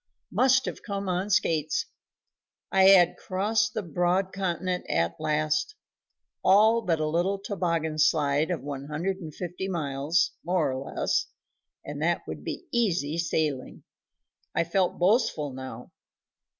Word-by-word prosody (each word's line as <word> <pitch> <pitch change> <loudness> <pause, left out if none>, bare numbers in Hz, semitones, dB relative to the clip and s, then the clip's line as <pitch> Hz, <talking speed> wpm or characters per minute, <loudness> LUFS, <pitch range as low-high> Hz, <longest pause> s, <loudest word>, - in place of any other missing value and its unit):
Must 260 0 +4
have - - -5
come 200 -2 -4
on 185 +2 -1
Skates. 155 -5 +1 0.9
I 190 0 +5
had 185 -3 +6
crossed 215 +3 0
the 215 - -2
broad 175 +3 0
continent 185 -1 -2
at 85 0 +1
last 155 - 0 0.7
all 220 +4 +5
but 165 -6 0
a 155 - 0
little 175 +6 0
toboggan 170 -6 -2
slide 150 -1 +2
of 175 -4 -2
one 140 -1 -5
hundred 170 +6 -2
and 165 -5 -8
fifty 180 +4 -5
miles, 155 -2 0
more 175 -4 +1
or 130 +1 -6
less, - - 0 0.6
and 145 0 -6
that 170 +2 +1
would - - -7
be - - -5
easy 175 - 0
sailing. 155 -5 -2 0.7
I 170 - +3
felt 180 +2 0
boastful 180 - +2
now. 130 0 -8
175 Hz, 135 wpm, -27 LUFS, 155-195 Hz, 0.9 s, had